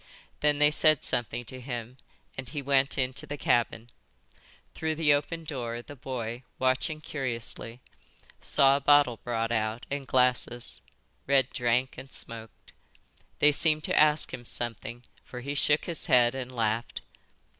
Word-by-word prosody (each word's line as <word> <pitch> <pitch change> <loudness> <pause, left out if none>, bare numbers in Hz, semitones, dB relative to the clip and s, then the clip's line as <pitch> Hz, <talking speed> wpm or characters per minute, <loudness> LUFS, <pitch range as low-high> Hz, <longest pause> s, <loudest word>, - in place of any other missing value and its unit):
Then 150 -1 +2
they 150 0 +5
said 155 -1 +3
something 120 0 -2
to 130 +2 -8
him 120 -1 -6 0.4
and 130 -1 -6
he 150 - -4
went 135 0 +2
into 130 +3 -2
the 145 0 -5
cabin. 120 -2 0 0.8
Through 160 0 -2
the 155 -2 +4
open 165 +3 -2
door 120 -6 -4
the 145 - -11
boy, 120 -3 -5 0.2
watching 130 +5 0
curiously, 125 -4 -5 0.6
saw 135 0 +4
a - - -6
bottle 145 -4 +5
brought 115 -1 -2
out 110 +1 -1
and 140 -1 -3
glasses. 125 -1 +1 0.5
Red 135 -2 +3
drank 125 +1 0
and 135 0 -11
smoked. 115 -1 -7 0.6
They 150 - +6
seemed 155 0 +2
to - - 0
ask 150 0 +4
him 130 -2 -6
something, 120 0 -5 0.2
for 125 - -8
he 140 +3 -4
shook 145 +1 +2
his 170 -3 -3
head 120 -1 +5
and 130 -1 -5
laughed. 115 -1 -2
130 Hz, 150 wpm, -28 LUFS, 120-145 Hz, 0.8 s, They